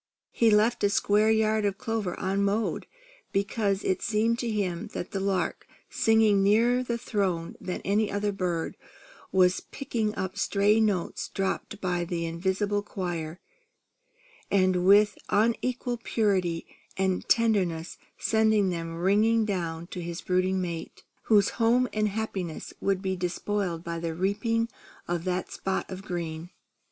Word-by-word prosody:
He 230 - +3
left 215 +2 +3
a 205 - +5
square 205 +2 +3
yard 220 -1 +2
of 200 -1 0
clover 220 -5 -2
unmowed, 200 +3 0 0.4
because 200 0 0
it 185 - 0
seemed 225 +2 +1
to 240 - -2
him 200 -2 -2
that 175 - -5
the 195 - -2
lark, 195 -1 -1 0.2
singing 220 -3 +4
nearer 230 +5 +4
the 240 -2 -2
Throne 190 -8 -2
than 180 - -4
any 205 +2 +1
other 205 +1 0
bird, 180 -4 -2 0.5
was 185 -1 +4
picking 225 -6 -3
up 190 -1 -4
stray 205 +2 +3
notes 205 -6 0
dropped 195 +2 -3
by 180 -2 0
the 170 -1 -3
Invisible 190 +5 -1
Choir, 175 -5 -4 1.1
and 185 -2 +2
with 205 +1 +5
unequalled 235 +2 0
purity 185 -7 0 0.3
and 190 -1 0
tenderness, 190 -8 +1 0.2
sending 220 -3 +3
them 165 -2 -4
ringing 215 +5 +3
down 170 -5 -3
to 180 +1 -7
his 170 0 -5
brooding 185 +1 +1
mate, 170 -3 -5 0.2
whose 205 -3 +4
home 245 +3 +4
and 215 0 +1
happiness 195 -6 -4
would 195 -1 0
be 190 0 0
despoiled 180 -1 -2
by 170 -1 -4
the 165 -1 -3
reaping 225 +5 0 0.4
of 175 0 -2
that 185 0 -2
spot 190 0 -2
of 185 0 -6
green. 170 -3 -5
195 Hz, 140 wpm, -27 LUFS, 180-215 Hz, 1.1 s, a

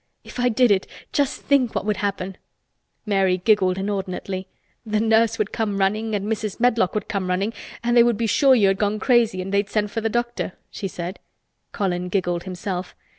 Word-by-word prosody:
If - - -10
I 245 0 +3
did 245 0 +3
it, 190 -1 +2 0.3
just 285 -1 0
think 265 -5 +2
what - - -1
would 210 -2 0
happen!" 190 -1 -3 0.7
Mary 195 -3 +2
giggled 185 -1 +2
inordinately. 190 -1 -3 0.4
"The 215 -2 0
nurse 225 +1 +3
would 215 -1 -1
come 210 -3 -1
running 210 +3 0
and 200 -1 -2
Mrs. 215 -2 -3
Medlock 230 -6 +2
would 210 - -2
come 195 -3 -2
running 195 +5 0 0.3
and 240 +1 +1
they 240 - +8
would 235 -2 +3
be 230 - 0
sure 265 +4 +5
you 210 -5 +4
had 195 - 0
gone 210 0 +1
crazy 230 -6 +2
and 195 +1 -6
they'd 200 0 +1
send 210 -1 0
for 225 - -2
the 225 - 0
doctor," 240 -4 -2 0.2
she 195 - -4
said. 180 0 -6 0.5
Colin 180 -3 -2
giggled 175 -2 -1
himself. 185 0 -5
205 Hz, 195 wpm, -23 LUFS, 190-225 Hz, 0.7 s, they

